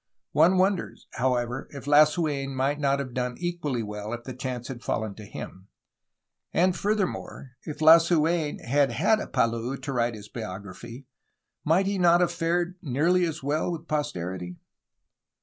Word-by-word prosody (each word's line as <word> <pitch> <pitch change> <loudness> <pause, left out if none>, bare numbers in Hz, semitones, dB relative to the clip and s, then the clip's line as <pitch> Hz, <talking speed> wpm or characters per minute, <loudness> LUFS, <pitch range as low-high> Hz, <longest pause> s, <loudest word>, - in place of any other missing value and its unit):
One 170 +5 +4
wonders, 190 0 0
however, 125 0 -1
if 140 -2 -9
Lasu^n 145 -2 +3
might 135 +3 0
not 140 -1 +2
have 135 -3 -5
done 125 0 -2
equally 170 -9 -2
well, 105 +1 -5
if 120 0 -6
the 130 - -7
chance 125 -1 -5
had 125 -3 -7
fallen 110 -3 -2
to 105 +1 -11
him. 95 -1 -9 0.8
And, 180 +1 +2
furthermore, 200 -9 -2
if 150 - -6
Lasu^n 165 -1 +4
had 140 +1 +2
had 215 - +3
a - - -5
Palou 115 +3 0
to 140 - -5
write 120 -2 0
his 105 -1 -10
bio 110 -6 -6
graphy, 115 +7 -10 0.6
might 170 +5 +3
he 200 0 -1
not 175 -1 +5
have 180 -1 +2
fared 175 +1 -1
nearly 170 +5 +2
as 155 -3 -4
well 150 +5 0
with 165 -1 -6
posterity? 90 - -3
140 Hz, 160 wpm, -26 LUFS, 120-170 Hz, 0.8 s, not